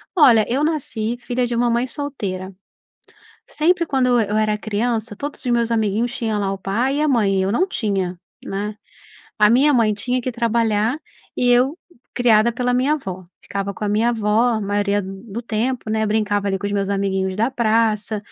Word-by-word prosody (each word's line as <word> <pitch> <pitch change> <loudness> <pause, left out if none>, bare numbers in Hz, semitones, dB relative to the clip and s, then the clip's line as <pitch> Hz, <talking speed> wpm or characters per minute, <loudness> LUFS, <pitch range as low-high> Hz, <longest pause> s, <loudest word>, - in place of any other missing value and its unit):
olha, 235 - +6
eu 265 +5 0
nasci 245 -7 -2
filha 245 0 -1
de 240 - -3
uma 240 +1 +2
mãe 240 +2 +1
solteira, 205 -11 -5 1.0
sempre 335 +3 +1
quando 265 -4 +1
eu 245 -1 +4
eu 210 -1 -1
era 215 -1 +1
criança 220 +1 -2
todos 285 +7 -6
os 250 - -1
meus 235 -1 +1
amiguinhos 225 +2 0
tinham 220 -5 -1
lá 195 -1 -1
o 195 - -5
pai 230 +9 -1
e - - 0
a 305 - +2
mãe, 210 -7 +2
e - - +2
eu 190 +1 0
não 365 - +2
tinha, 195 - -2 0.3
né. 205 +2 -4 0.6
A 210 0 +5
minha 275 +6 +4
mãe 225 -4 +3
tinha 245 +5 -1
que 255 - -3
ir - - -4
trabalhar 230 0 +1 0.4
e 245 - +2
eu, 255 +6 +3 0.4
criada 235 -2 +4
pela 250 +1 0
minha 260 +4 +2
avó, 190 -11 -5 0.2
ficava 200 0 -4
com - - -7
a 210 - 0
minha 220 +3 +2
avó 225 +1 +2
a 215 - -2
maioria 205 0 0
d 190 - -8 0.2
do 225 +1 -6
tempo, 235 +1 -2
né, 220 0 +1
brincava 205 -1 0
ali 195 -1 0
com 200 - -6
os 200 - -2
meus 200 -1 0
amiguinhos 190 -1 -1
da 225 +6 0
praça, 220 -3 +1
225 Hz, 205 wpm, -20 LUFS, 205-245 Hz, 1.0 s, olha